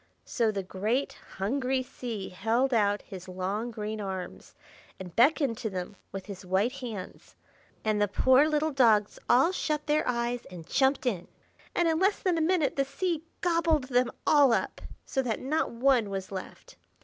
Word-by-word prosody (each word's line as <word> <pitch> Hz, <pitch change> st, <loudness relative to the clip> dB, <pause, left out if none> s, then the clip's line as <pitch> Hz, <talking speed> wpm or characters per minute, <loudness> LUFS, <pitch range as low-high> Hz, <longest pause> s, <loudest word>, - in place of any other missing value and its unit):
So 230 Hz, -3 st, +1 dB
the 200 Hz, -2 st, -3 dB
great 215 Hz, +9 st, -1 dB, 0.2 s
hungry 255 Hz, +6 st, 0 dB
Sea 230 Hz, -6 st, -6 dB
held 230 Hz, +8 st, 0 dB
out 205 Hz, -2 st, +2 dB
his 190 Hz, -3 st, -10 dB
long, 190 Hz, +5 st, -3 dB
green 215 Hz, -1 st, -4 dB
arms, 190 Hz, -2 st, -6 dB, 0.4 s
and 180 Hz, -3 st, -9 dB
beckoned 260 Hz, -1 st, +3 dB
to 220 Hz, -, -2 dB
them 185 Hz, +1 st, -5 dB, 0.2 s
with 195 Hz, -1 st, -6 dB
his 200 Hz, -2 st, -8 dB
white 190 Hz, +6 st, +1 dB
hands; 235 Hz, -8 st, -8 dB, 0.5 s
and 215 Hz, -1 st, +1 dB
the 205 Hz, -, +4 dB
poor 260 Hz, +8 st, +4 dB
little 310 Hz, +1 st, +1 dB
dogs 225 Hz, -6 st, +3 dB
all 265 Hz, +8 st, +5 dB
shut 305 Hz, -5 st, -2 dB
their 300 Hz, 0 st, +2 dB
eyes 240 Hz, 0 st, -1 dB
and 175 Hz, -3 st, -10 dB
jumped 265 Hz, -, +2 dB
in, 190 Hz, -8 st, -1 dB, 0.5 s
and 345 Hz, -, +3 dB
in 320 Hz, -1 st, +2 dB
less 390 Hz, +2 st, +3 dB
than 355 Hz, -3 st, +1 dB
a -, -, +1 dB
minute 315 Hz, -4 st, +1 dB
the 275 Hz, -, +3 dB
Sea 335 Hz, +2 st, -2 dB, 0.2 s
gobbled 330 Hz, -6 st, +2 dB
them 250 Hz, -1 st, +3 dB, 0.2 s
all 285 Hz, -4 st, +6 dB
up, 205 Hz, -5 st, -1 dB, 0.2 s
so 265 Hz, -, 0 dB
that 240 Hz, -4 st, -2 dB
not 305 Hz, +5 st, 0 dB
one 240 Hz, -2 st, +2 dB
was 195 Hz, -1 st, -5 dB
left. 190 Hz, -1 st, -8 dB
240 Hz, 175 wpm, -28 LUFS, 200-280 Hz, 0.5 s, all